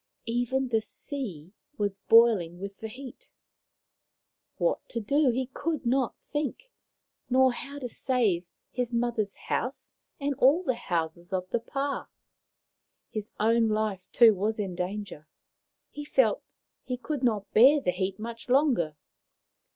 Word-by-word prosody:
Even 245 +3 0
the 225 -2 +2
sea 205 - -6 0.2
was 205 -2 -1
boiling 210 -7 +4
with 200 +1 -7
the 220 - -5
heat. 265 - -11 1.3
What - - +1
to 235 - -3
do 280 +6 +2
he 255 +2 0
could 310 -2 -2
not 255 0 +1
think, 305 - -4 0.6
nor 260 0 +4
how 280 +4 -8
to 260 -3 -4
save 220 -8 0 0.2
his 245 -1 -2
mother's 235 -4 0
house 255 +3 -3 0.3
and 285 0 0
all 290 +8 +5
the 260 - +1
houses 170 -5 -3
of 185 -1 -2
the 235 - +1
pah. 275 +4 -3 1.0
His 215 -1 -5
own 225 +1 +3
life, 215 -4 -1
too, 230 -2 +7
was 210 +3 -1
in 195 -4 -3
danger. 180 -3 -5 0.6
He 295 - -7
felt - - +2 0.4
he 250 - -3
could 270 +3 -4
not 215 -5 0
bear 270 +7 +7
the 180 - 0
heat 190 +1 -2
much 230 +2 -7
longer. 250 - +3
230 Hz, 140 wpm, -28 LUFS, 200-265 Hz, 1.3 s, too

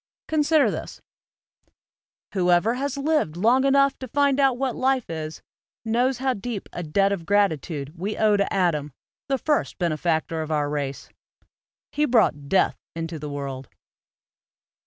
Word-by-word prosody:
Consider 310 -1 +3
this: - - -6 0.6
" - - -41
Whoevei 180 +4 +3
has 280 +1 -3
lived 280 - 0
long 240 +7 +3
enough 275 0 +3
to 260 - -6
find 280 +2 +2
out 270 -3 +3
what 260 -2 -1
life 260 -5 0
is, 155 -1 -6 0.4
knows 245 +3 +1
how 260 +1 0
deep 215 -1 -5
a - - -4
debt 195 +5 +1
of 195 -4 -2
gratitude 160 -7 0
we 195 +5 -4
owe 215 -1 +4
to 200 0 0
Adam, 150 -7 0 0.4
the 270 - +2
first 295 +4 0
bene 170 -4 0
factor 160 -1 -1
of 155 - -5
our 145 -1 0
race; 140 -2 -4 0.8
he 300 +1 +1
brought 180 - +2
death 195 - +2 0.2
into 165 -1 -4
the 150 0 -6
world." 135 -2 -6
200 Hz, 155 wpm, -24 LUFS, 155-265 Hz, 0.8 s, owe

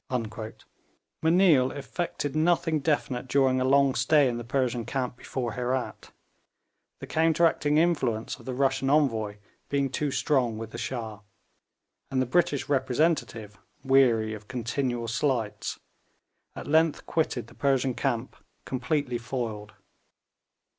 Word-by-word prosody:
M'Neill 160 -6 +4
effected 145 +1 -4
nothing 165 0 +2
definite 135 -4 -1
during 130 -1 +2
a - - +2
long 135 0 +4
stay 140 +4 +4
in 120 -1 -2
the 120 - -5
Persian 125 -1 -1
camp 125 +1 -3
before 125 -1 -4
Herat, 125 +2 -3 0.9
the - - -8
counteracting 160 -2 +2
influence 135 -10 0
of - - -15
the 130 - -2
Russian 135 0 +1
envoy 115 -8 +1 0.3
being 140 -2 0
too 145 +3 -1
strong 130 -5 +1
with 115 0 -7
the - - -7
Shah; 110 -5 -4 0.9
and 135 - 0
the 130 - +2
British 145 0 +1
representative, 130 -6 0 0.2
weary 125 -5 +3
of 105 -1 -9
continual 120 -1 -2
slights, 115 -4 -1 0.8
at - - -7
length 160 +1 +2
quitted 160 -1 -1
the - - -17
Persian 135 -2 +1
camp 120 -1 -2 0.3
completely 130 -1 -1
foiled. 115 -4 -5
130 Hz, 125 wpm, -27 LUFS, 120-145 Hz, 0.9 s, M'Neill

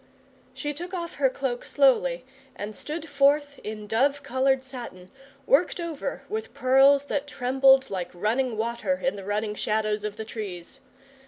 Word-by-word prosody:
She 295 -1 -3
took 350 +5 -6
off 340 -2 -4
her 265 - +5
cloak 255 -2 -3
slowly, 265 -2 +2 0.3
and 205 +1 -6
stood 315 +2 -5
forth 285 0 +2
in 215 0 -6
dove 275 +6 +1
coloured 260 +1 +1
satin, 240 -9 -9 0.3
worked 325 +7 +3
over 335 -4 -4
with 440 +2 -5
pearls 270 +2 +5
that 285 0 -2
trembled 265 -1 +3
like 180 -2 -3
running 225 +6 -1
water 235 +5 -1
in 270 - +1
the 200 - -8
running 210 +2 -2
shadows 215 0 -1
of 210 -1 -4
the 220 - -5
trees. 205 +1 -7
265 Hz, 155 wpm, -26 LUFS, 215-280 Hz, 0.3 s, her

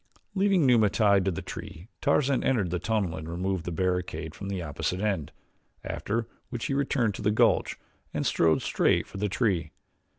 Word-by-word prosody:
Leaving 195 -4 +3
Numa 115 -5 +5
tied 100 -2 +3
to - - +3
the 85 - -4
tree 85 +5 -8
Tarzan 140 -2 +2
entered 105 -10 +1
the 90 - -1
tunnel 100 -3 0
and 80 +1 -7
removed 90 +1 -2
the 90 - -3
barricade 85 -3 -2
from 100 - -7
the 95 -2 -2
opposite 85 +3 -3
end, 100 -7 -1 0.5
after 115 +2 -2 0.2
which 120 -2 -4
he - - -1
returned 135 -5 +1
to - - -7
the 105 - +2
gulch 105 - +2 0.3
and - - -2
strode 80 -1 +3
straight - - +2
for 100 - -9
the 105 +1 0
tree. 95 -7 0
100 Hz, 185 wpm, -28 LUFS, 90-115 Hz, 0.5 s, Numa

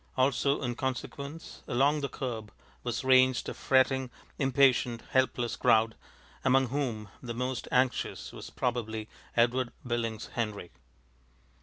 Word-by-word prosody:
Also, 140 +2 +2
in 120 -1 -1
consequence, 140 +4 -5
along 140 +5 +2
the 140 - -2
curb 115 -5 -5 0.3
was 120 +2 -2
ranged 130 -1 +4
a - - -4
fretting, 130 -1 +2 0.3
impatient, 130 -3 +3
helpless 130 -2 +1
crowd, 110 0 +4 0.5
among 130 -1 +4
whom 120 -6 -2
the 120 -2 -5
most 125 +1 -2
anxious 125 0 0
was - - -9
probably 110 -3 -2 0.3
Edward 120 +1 +3
Billings 115 -2 -2
Henry. 105 -7 -3
125 Hz, 120 wpm, -30 LUFS, 115-130 Hz, 0.5 s, ranged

